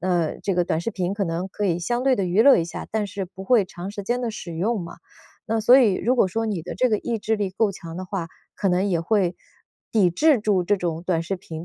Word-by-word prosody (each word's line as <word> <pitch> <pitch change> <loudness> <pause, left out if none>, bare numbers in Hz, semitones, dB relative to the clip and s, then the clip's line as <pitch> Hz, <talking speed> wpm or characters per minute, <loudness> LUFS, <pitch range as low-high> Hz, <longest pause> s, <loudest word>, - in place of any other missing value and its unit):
那 175 -3 0
这 200 - -1
个 175 - +3
短 160 -2 -1
视 200 - -3
频 185 -2 -2
可 205 - -2
能 170 +1 -2
可 205 +2 -4
以 175 -4 +1
相 240 +8 -1
对 260 -1 +3
地 195 - 0
娱 185 +5 +3
乐 280 +2 +7
一 165 - 0
下， 165 - -7
但 215 -1 -1
是 200 0 -5
不 190 +1 -11
会 225 -1 +4
长 185 +1 -8
时 205 - -6
间 240 +5 -1
地 235 -3 -2
使 170 -5 -7
用 210 +5 0
嘛， 170 - -8 0.5
那 225 -1 0
所 245 +5 +7
以 225 -7 +4
如 250 +7 0
果 220 - +4
说 225 +5 -2
你 210 -6 -2
的 165 - -7
这 255 - +2
个 215 -3 +1
意 235 +2 -2
志 220 +1 0
力 205 -2 -1
够 205 +2 +1
强 165 -3 -9
的 185 - -5
话， 185 -2 -4 0.3
可 195 - 0
能 180 +1 +2
也 175 -4 +1
会 180 0 +1 0.6
抵 200 -6 +4
制 280 - +3
住 205 -4 +1
这 205 +4 +2
种 170 -2 -3
短 165 -3 +1
视 190 +3 -3
频 165 -2 -8
195 Hz, 295 characters per minute, -23 LUFS, 175-220 Hz, 0.6 s, 乐